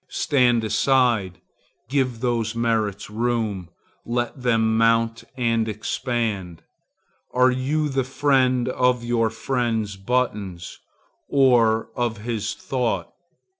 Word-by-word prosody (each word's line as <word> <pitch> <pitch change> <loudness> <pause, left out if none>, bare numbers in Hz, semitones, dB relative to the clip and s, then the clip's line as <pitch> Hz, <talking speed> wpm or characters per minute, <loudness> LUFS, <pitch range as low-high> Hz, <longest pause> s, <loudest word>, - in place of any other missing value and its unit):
Stand 125 -5 +2
aside; 110 -4 +1 0.5
give 130 -3 -1
those 115 -3 -1
merits 110 -3 -1
room; 110 -5 -2 0.3
let 120 +2 -3
them 115 -2 +2
mount 115 0 +2
and 115 -2 +1
expand. 105 -5 -3 0.7
Are 125 0 +5
you 140 +5 0
the 135 -2 0
friend 130 -2 +2
of 125 -1 +1
your 120 -1 +1
friend's 115 -3 -2
buttons, 100 -5 -2 0.5
or 120 -5 +3
of 120 -2 -1
his 110 0 -3
thought? 125 -4 -2
115 Hz, 100 wpm, -23 LUFS, 110-125 Hz, 0.7 s, Are